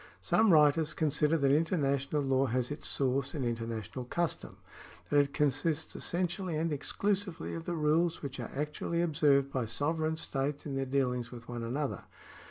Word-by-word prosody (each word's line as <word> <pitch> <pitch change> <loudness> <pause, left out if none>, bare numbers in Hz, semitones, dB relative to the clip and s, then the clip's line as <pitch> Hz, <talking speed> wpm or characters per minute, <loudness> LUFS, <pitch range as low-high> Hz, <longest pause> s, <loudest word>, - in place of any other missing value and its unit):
Some 220 -2 +3
writers 155 0 +4
consider 155 0 +2
that 140 -3 +3
international 145 -2 +1
law 135 0 +2
has 125 +2 -1
its 145 - -2
source 135 +2 0
in 140 - -2
inter 115 -1 -2
national 115 +2 -5
custom 170 +6 -2 0.3
— - - -20
that 145 - +5
it 140 -1 +2
consists 150 +2 0
essentially 180 -1 -1
and 160 0 0
exclusively 195 +5 -2
of 165 0 -6
the 175 - -2
rules 160 +2 +1
which 140 -2 -5
are - - -5
actually 150 +4 -1
observed 145 -4 +3
by 125 -4 -1
sovereign 155 +7 -1
states 145 -1 -3
in 145 - -4
their 135 0 -1
dealings 125 -3 0
with 120 -2 -10
one 120 -1 -5
another. 130 +5 -3
145 Hz, 175 wpm, -31 LUFS, 135-160 Hz, 0.3 s, that